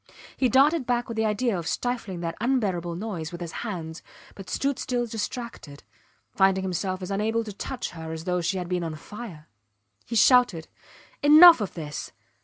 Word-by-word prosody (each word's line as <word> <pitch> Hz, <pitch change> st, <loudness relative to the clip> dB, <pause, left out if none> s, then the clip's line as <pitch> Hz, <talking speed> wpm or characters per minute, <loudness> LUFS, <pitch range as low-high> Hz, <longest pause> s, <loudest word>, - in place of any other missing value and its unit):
He 255 Hz, -, +1 dB
darted 275 Hz, +3 st, +3 dB
back 245 Hz, -1 st, 0 dB
with 230 Hz, -, -5 dB
the 220 Hz, 0 st, 0 dB
idea 215 Hz, +1 st, 0 dB
of 170 Hz, -2 st, -4 dB
stifling 230 Hz, -7 st, -3 dB
that 165 Hz, -1 st, -3 dB
unbearable 195 Hz, -9 st, 0 dB
noise 180 Hz, -5 st, -5 dB
with 175 Hz, -, -7 dB
his 170 Hz, -2 st, -6 dB
hands, 170 Hz, -7 st, -6 dB, 0.3 s
but 195 Hz, -2 st, -11 dB
stood 275 Hz, +7 st, -1 dB
still 245 Hz, -1 st, -1 dB
distracted, 225 Hz, -, -6 dB, 0.5 s
finding 190 Hz, -1 st, +2 dB
himself 185 Hz, 0 st, -3 dB
as 185 Hz, -, -5 dB
unable 220 Hz, +3 st, 0 dB
to 210 Hz, -2 st, -8 dB
touch 250 Hz, +5 st, -5 dB
her 160 Hz, -1 st, -8 dB
as 160 Hz, 0 st, -6 dB
though 180 Hz, 0 st, -1 dB
she 180 Hz, +3 st, -1 dB
had 180 Hz, -1 st, -4 dB
been 180 Hz, -1 st, -1 dB
on 160 Hz, -2 st, -4 dB
fire. 175 Hz, -3 st, -10 dB, 0.6 s
He 230 Hz, -, -4 dB
shouted, 230 Hz, -8 st, +4 dB, 0.5 s
Enough 310 Hz, 0 st, +9 dB
of 200 Hz, -, -4 dB
this! 150 Hz, -4 st, -6 dB
200 Hz, 180 wpm, -25 LUFS, 175-240 Hz, 0.6 s, Enough